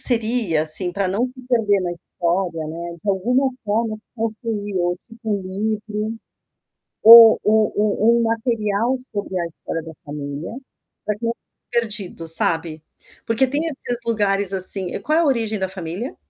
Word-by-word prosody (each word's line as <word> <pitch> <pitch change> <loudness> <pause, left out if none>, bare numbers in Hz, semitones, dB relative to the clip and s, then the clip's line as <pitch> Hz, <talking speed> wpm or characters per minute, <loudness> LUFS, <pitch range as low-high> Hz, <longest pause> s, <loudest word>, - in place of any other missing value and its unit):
seria, 225 - +3
assim, 175 +3 +2
pra 195 -1 -1
não 220 +7 0
se 255 0 -13
perder 210 -5 +2
na 175 -1 -3
história, 170 -1 -3
né, 170 +2 -7
de 210 - -6
alguma 245 +8 +1
forma 215 +1 -1 0.2
construir 220 -3 -4
ou 175 0 0
tipo 225 -1 -8
um 200 -2 -1
livro, 210 +3 -4 0.9
ou 225 0 +10
um 215 0 +3 0.4
um - - +2
um - - +1
material 230 +1 -1 0.2
sobre 200 -2 -3
a 170 - -2
história 165 0 -6
da 165 - -9
família, 145 +5 -6 0.5
pra 210 -1 -1
que 230 - -6
não 230 - 0 0.4
perdido, 210 -8 -3
sabe? 160 -1 +2 0.4
Porque 235 +4 +3
tem 285 +4 -1
esses 245 -5 -4
lugares, 200 -3 0
assim 190 0 +4
e - - -3
qual 310 +2 0
é - - +4
a - - +1
origem 225 -6 0
da 190 -1 -2
família? 190 - -5
210 Hz, 160 wpm, -20 LUFS, 180-230 Hz, 0.9 s, ou